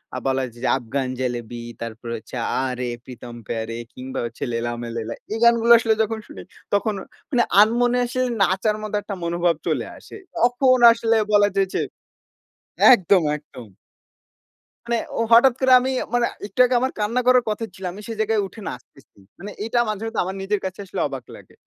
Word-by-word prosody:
আ - - -2
বলা 135 0 +1
যায় 120 +1 -16
যে, - - +2
'আফগান 130 +1 -3
জেলেবি' 120 -2 -4
তারপরে 115 0 -6
হচ্ছে 110 - -11
'Aa 130 +3 -1
Re 125 -1 -2
Pritam 120 -1 -10
Pyaare' 115 +1 -4
কিংবা 130 +1 -6
হচ্ছে 115 - -7
'Laila 115 +1 -2
Main 120 -1 -6
Laila' 115 0 -4 0.2
এই 225 - -3
গানগুলো 235 0 +5
আসলে 225 -1 +2
যখন 220 +1 -3
শুনি, - - -10 0.3
তখন 210 +1 +1
অ - - -14 0.6
আনমনে 245 +3 +3
আসলে 255 +1 -1 0.2
নাচার 195 +4 +1
মতো 210 0 -4
একটা 200 -1 -6
মনোভাব 170 0 +1
চলে - - 0
আসে। - - -13 0.2
তখন 250 +2 +3
আসলে 230 0 +1 0.2
বলা 205 0 +6
যায় 195 -1 +2
যে - - +1 1.1
একদম, 190 -3 +4 0.2
একদম। 125 -6 -13 1.2
মানে 235 0 0 0.2
ও - - +2
হঠাৎ 240 +2 +7
করে 260 -1 +2
আমি 260 +1 -1 0.2
মানে, 240 -1 +3 0.2
একটু 250 - -13
আগে 250 0 +1
আমার 260 +1 0
কান্না 230 +4 0
করার 250 -1 +5
কথা 215 +2 -3
ছিল। 190 - -12
আমি 205 - -10
সেই 225 -2 -6
জায়গায় 220 -1 +1
উঠে 220 - -13
নাচতেছি। 125 -1 -11 0.2
মানে 205 +3 -7
এটা 240 +1 0
মাঝে 215 +1 -3
মধ্যে 225 - -1
আমার 190 +1 -4
নিজের 200 +1 -1
কাছে 190 +1 -5
আসলে - - -6
অবাক 135 -3 -7
লাগে। - - -16
200 Hz, 185 wpm, -22 LUFS, -, 1.2 s, হঠাৎ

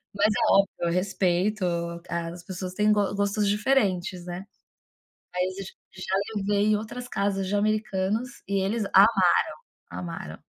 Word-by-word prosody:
Mas 205 +1 +4
é - - +1
óbvio, 195 0 +5
eu 170 - 0
respeito, 185 +2 +1 0.4
as 170 0 -4
pessoas 185 -1 -6
têm 210 +2 +3
go 205 -1 +1
gostos 200 +1 0
diferentes, 200 -5 +1
né. 180 +2 -6 0.9
Mas 180 +1 -1
j - - -10 0.2
já 185 0 -4 0.2
levei 205 0 +1
em - - +4
outras 240 +4 -6
casas 195 -2 -1
de 200 - -2
americanos 215 +2 -1
e 200 0 0
eles 210 +3 0
amaram, 210 +4 +6 0.7
amaram. 165 - -7
195 Hz, 140 wpm, -26 LUFS, 180-210 Hz, 0.9 s, amaram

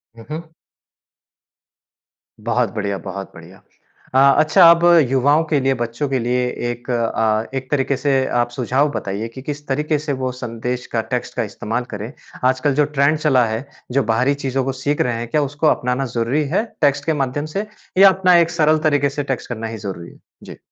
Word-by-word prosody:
हुँ, 115 -1 -13
हुँ। 160 +1 -7 1.9
बहुत 120 -3 0
बढ़िया, 100 -2 -2
बहुत 95 0 -7
बढ़िया। - - -14 0.5
अ, 130 - +4 0.2
अच्छा 165 +3 +6
अब 170 0 +3 0.3
युवाओं 140 +4 +3
के 150 -2 +1
लिए, 135 0 +1
बच्चों 120 +3 -3
के 135 -1 0
लिए 125 +1 0 0.2
एक 120 +1 -10
अ, 110 -2 0
एक 130 0 -6
तरीके 140 -1 +1
से 135 -1 +1 0.2
आप 120 - -1
सुझाव 130 +4 0
बताइए 100 -2 -4
कि 130 +3 -10
किस 145 +1 -6
तरीके 150 +3 0
से 150 -1 -3
वो 130 0 -1
संदेश 125 +1 -4
का 115 - +1
टेक्स्ट - - -3
का - - 0
इस्तेमाल 115 +3 -4
करें। 105 +5 -6 0.4
आजकल 130 +2 +1
जो 150 0 +3
ट्रेंड 140 +3 +3
चला 135 -5 +3
है, 110 +4 -3 0.3
जो 135 +2 +2
बाहरी 130 +5 +2
चीज़ों 135 0 0
को 135 - 0
सीख 145 +1 0
रहे 125 -2 0
हैं, 120 - -4
क्या 150 +4 +1
उसको 145 +2 -1
अपनाना 125 -1 +1
ज़रूरी 120 +6 +1
है 215 - +2 0.2
टेक्स्ट 145 -1 +2
के 160 - +1
माध्यम 140 +3 -3
से 205 +2 -2 0.3
या 195 +1 +9
अपना 185 -1 +3
एक 170 -1 +3
सरल 155 -2 +3
तरीके 145 -1 +2
से 145 +1 -4
टेक्स्ट 125 - -8
करना 115 -2 -4
ही 110 0 -6
ज़रूरी 90 -5 -7
है? - - -20 0.2
जी। - - -10
130 Hz, 195 wpm, -19 LUFS, 120-150 Hz, 1.9 s, या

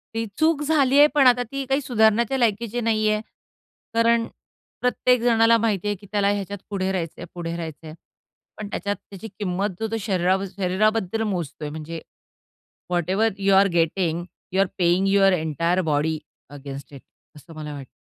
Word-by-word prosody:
ती 225 0 -1
चूक 315 -1 +3
झाली 285 -3 +3
आहे. 295 - +9
पण 285 -3 +5
आता 245 0 +4
ती 275 0 -3
काही 270 +2 0
सुधारण्याच्या 235 0 +2
लायकीची 235 0 0
नाहीये. 215 -2 +1 0.7
कारण 230 0 +3 0.5
प्रत्येक 250 -1 +2
जणाला 230 -1 +4
माहिती 210 -3 0
आहे, 205 - 0
की 200 +1 -16
त्याला 200 -1 +2
ह्याच्यात 200 0 -2
पुढे 190 -2 -1
राहायचंय, 170 -4 -4
पुढे 170 -1 -4
राहायचंय. 160 -2 -7 0.6
पण 210 - -6
त्याच्यात 205 0 -2
त्याची 205 +2 -11
किंमत 195 0 -1
जर 220 0 -3
तो 225 - 0
शरीरा 190 -2 +1 0.2
शरीराबद्दल 215 +3 +1
मोजतोय 165 -6 -4
म्हणजे 160 +2 -7 0.9
whatever 185 +5 +1
you 195 0 +2
are 195 +1 +6
getting, 170 0 +1 0.3
you 190 - +3
R 195 - +2
paying 180 +2 +2
your 195 0 +4
entire 165 +2 0
body 155 +2 +1 0.3
against 140 0 -9
it, 135 - -10 0.3
असं 155 +3 -14
मला 150 -1 -6
वाटतं. 135 -3 -8
200 Hz, 160 wpm, -23 LUFS, 170-225 Hz, 0.9 s, आहे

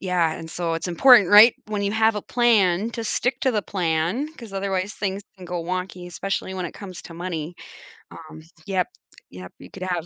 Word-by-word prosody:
yeah 180 -4 +1
and 160 0 -9
so 170 0 -2
it's 165 +2 -4
important 215 +3 +6
right, 215 +3 +9
when 210 -1 -2
you 200 +1 -1
have 220 0 +2
a 210 - -3
plan, 220 -4 +2
to 230 - -4
stick 245 +3 -1
to 265 - +3
the 210 -2 0
plan, 175 - -1
'cause 230 -5 -11
otherwise 195 +1 -2
things 200 0 -3 0.2
can 180 - -10
go 175 -1 -4
wonky, 185 0 -4
especially 190 +1 -4
when 185 -2 -3
it - - -10
comes 190 -4 -9
to 165 - -11
money. 170 -1 -5 0.6
Um, 160 -1 -12 0.3
yep, 185 -2 0 0.4
yep, 90 0 -10
you - - -13
could 190 - -8
have 175 -3 -2
185 Hz, 205 wpm, -23 LUFS, 175-210 Hz, 0.6 s, right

